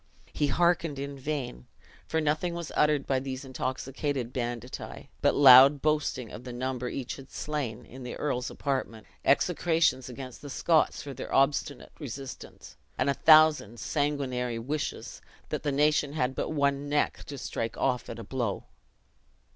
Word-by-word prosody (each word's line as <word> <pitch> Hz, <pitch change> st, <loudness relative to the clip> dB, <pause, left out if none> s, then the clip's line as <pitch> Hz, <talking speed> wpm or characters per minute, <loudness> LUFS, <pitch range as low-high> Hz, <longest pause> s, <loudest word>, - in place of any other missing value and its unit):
He 145 Hz, -, +1 dB
hearkened 165 Hz, 0 st, +1 dB
in 140 Hz, +1 st, -5 dB
vain, 130 Hz, -, -4 dB, 0.4 s
for 160 Hz, -, 0 dB
nothing 155 Hz, +3 st, 0 dB
was 170 Hz, -2 st, -5 dB
uttered 150 Hz, -2 st, +3 dB
by 135 Hz, -1 st, +1 dB
these 135 Hz, +1 st, -6 dB
intoxicated 130 Hz, 0 st, -3 dB
banditti, 120 Hz, -2 st, -5 dB
but -, -, +3 dB
loud 135 Hz, +1 st, +9 dB
boastings 150 Hz, -6 st, 0 dB
of 120 Hz, -, -8 dB
the 125 Hz, -, -7 dB
number 125 Hz, 0 st, -3 dB
each 130 Hz, -2 st, -5 dB
had 135 Hz, -1 st, -12 dB
slain 130 Hz, -6 st, -4 dB
in 130 Hz, +2 st, -12 dB
the 125 Hz, -1 st, -6 dB
earl's 125 Hz, -4 st, -2 dB
apartment; 130 Hz, -6 st, -3 dB, 0.2 s
execrations 160 Hz, -3 st, +2 dB
against 130 Hz, 0 st, -9 dB
the 145 Hz, -, -8 dB
Scots 160 Hz, +3 st, +2 dB
for 140 Hz, -, -7 dB
their -, -, -7 dB
obstinate 140 Hz, +1 st, +1 dB
resistance; 135 Hz, -2 st, -8 dB, 0.2 s
and 140 Hz, -, +2 dB
a -, -, +1 dB
thousand 155 Hz, -8 st, +5 dB
sanguinary 135 Hz, -5 st, -1 dB
wishes, 140 Hz, +6 st, -4 dB, 0.3 s
that -, -, -2 dB
the 145 Hz, -, -1 dB
nation 145 Hz, 0 st, +2 dB
had 130 Hz, -4 st, 0 dB
but -, -, -3 dB
one 140 Hz, -2 st, 0 dB
neck, 145 Hz, 0 st, 0 dB
to 140 Hz, -, -7 dB
strike 115 Hz, -3 st, -4 dB
off 125 Hz, -2 st, 0 dB
at -, -, -6 dB
a 115 Hz, -, -7 dB
blow. 115 Hz, -3 st, -3 dB
135 Hz, 155 wpm, -28 LUFS, 125-150 Hz, 0.4 s, loud